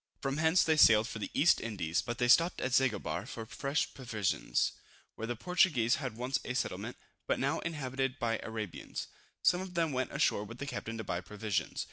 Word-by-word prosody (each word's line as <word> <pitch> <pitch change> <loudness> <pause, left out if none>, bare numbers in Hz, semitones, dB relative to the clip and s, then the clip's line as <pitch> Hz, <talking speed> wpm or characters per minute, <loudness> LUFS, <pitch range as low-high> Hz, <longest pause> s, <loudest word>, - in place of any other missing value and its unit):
From 135 0 -2
hence 160 +3 +4
they 160 -1 +2
sailed 110 -5 +7
for 110 - -6
the - - -4
East 170 +4 +4
Indies, 95 -7 -1
but 120 0 -5
stopped 170 +5 +4
at 130 - -2
Zanguebar 105 -8 +1
for 115 -3 -6
fresh 140 +6 -2
provisions, 110 -7 0 0.4
where 115 - -5
the 120 - -2
Portuguese 130 -6 +2
had 125 -5 -4
once 130 +2 -1
a 130 - -4
settlement, - - -3 0.3
but - - +1
now - - 0
inhabited 135 -4 -2
by 115 -3 0
Arabians. 110 -4 -5 0.3
Some 180 0 +4
of 185 -2 -8
them 165 -2 +1
went 130 -1 -1
ashore 100 - +1
with 115 +3 -9
the 140 - -5
captain 115 -4 -5
to 110 - -4
buy 90 -3 -2
provisions. 100 -2 -3
125 Hz, 190 wpm, -32 LUFS, 110-140 Hz, 0.4 s, sailed